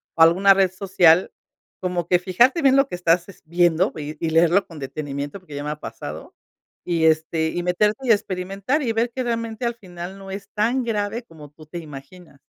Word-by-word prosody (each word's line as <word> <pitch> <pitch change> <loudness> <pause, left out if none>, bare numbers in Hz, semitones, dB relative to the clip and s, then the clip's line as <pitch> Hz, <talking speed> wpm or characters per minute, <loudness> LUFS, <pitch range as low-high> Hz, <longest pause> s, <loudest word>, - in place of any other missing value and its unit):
o 165 - 0
alguna 185 +5 +6
red 190 -2 +2
social. 185 -3 +3 0.5
Como 180 -2 -2
que 180 - +4
fijarte 240 - +3
bien 270 -1 +5
lo 275 0 +4
que 180 - -5
estás, 175 0 +1
es 195 - -14
viendo 175 +2 +2
y 150 +1 -6
y - - 0
leerlo 170 +4 +3
con 165 -3 -12
detenimiento 145 +4 -5
porque 155 -6 -11
ya 145 - -5
me 150 - -3
ha 150 - -6
pasado. - - -8 0.5
Y, 170 -2 +1
este, 160 0 +1
y 175 - -3
meterte 210 +8 0
y - - +5
experimentar 195 +7 -1
y 230 - 0
ver 230 +2 0
que 255 +1 -3
realmente 230 0 -3
al 235 0 -1
final 180 -2 -9
no 195 -1 -10
es 200 +1 -7
tan 235 +5 +1
grave 220 +1 -2
como 155 -7 -14
tú 155 +1 -16
te 170 +3 -7
imaginas. 150 +1 -12
180 Hz, 205 wpm, -22 LUFS, 160-210 Hz, 0.5 s, alguna